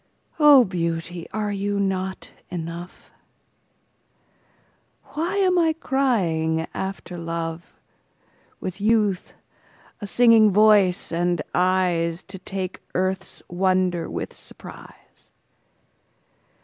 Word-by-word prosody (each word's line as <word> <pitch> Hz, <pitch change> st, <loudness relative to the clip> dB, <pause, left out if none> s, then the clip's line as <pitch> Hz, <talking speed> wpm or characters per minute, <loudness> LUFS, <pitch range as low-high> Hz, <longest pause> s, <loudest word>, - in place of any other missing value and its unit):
O 290 Hz, -4 st, +8 dB
beauty, 170 Hz, -1 st, -3 dB
are 215 Hz, -1 st, -2 dB
you 200 Hz, 0 st, -2 dB
not 190 Hz, -1 st, -2 dB, 0.2 s
enough? 170 Hz, +1 st, -7 dB, 2.0 s
Why 335 Hz, +6 st, -2 dB
am 370 Hz, -2 st, +3 dB
I 325 Hz, -2 st, +3 dB
crying 180 Hz, -, 0 dB
after 190 Hz, -2 st, -5 dB
love, 165 Hz, 0 st, -5 dB, 0.9 s
With 185 Hz, +2 st, -6 dB
youth, 210 Hz, -3 st, +1 dB, 0.7 s
a 205 Hz, -, -5 dB
singing 230 Hz, -1 st, +6 dB
voice, 205 Hz, -4 st, +4 dB
and 175 Hz, 0 st, 0 dB
eyesTo 180 Hz, 0 st, 0 dB
take 190 Hz, -1 st, -5 dB
earth's 190 Hz, +1 st, -1 dB
wonder 185 Hz, -1 st, 0 dB
with -, -, -5 dB
surprise? -, -, -11 dB
185 Hz, 85 wpm, -23 LUFS, 175-210 Hz, 2.0 s, O